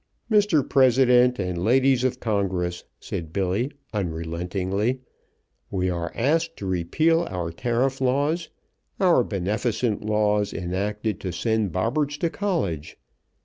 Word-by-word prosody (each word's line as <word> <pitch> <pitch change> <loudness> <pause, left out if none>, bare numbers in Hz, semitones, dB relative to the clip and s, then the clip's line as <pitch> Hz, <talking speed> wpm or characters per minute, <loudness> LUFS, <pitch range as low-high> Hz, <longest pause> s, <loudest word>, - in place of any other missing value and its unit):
"Mr. 205 -10 +3
President 125 -1 +4
and 90 -3 -2
Ladies 130 +2 +3
of 130 - 0
Congress," 95 -5 -1
said 80 -2 -6
Billy 100 - 0 0.2
unrelentingly; 90 +5 -2 0.7
"we 95 -1 0
are 85 -1 -3
asked 165 +6 +1
to 100 - -6
repeal 155 - +1
our 90 -3 -3
tariff 125 +7 -1
laws, 145 +6 +1 0.5
our 175 -9 +4
beneficent 105 +3 -1
laws, 105 -1 +1
enacted 100 +4 -2
to 95 - -4
send 110 +2 0
Bobberts 140 - 0
to 165 +1 -1
college. 100 - -2
110 Hz, 115 wpm, -24 LUFS, 90-130 Hz, 0.7 s, President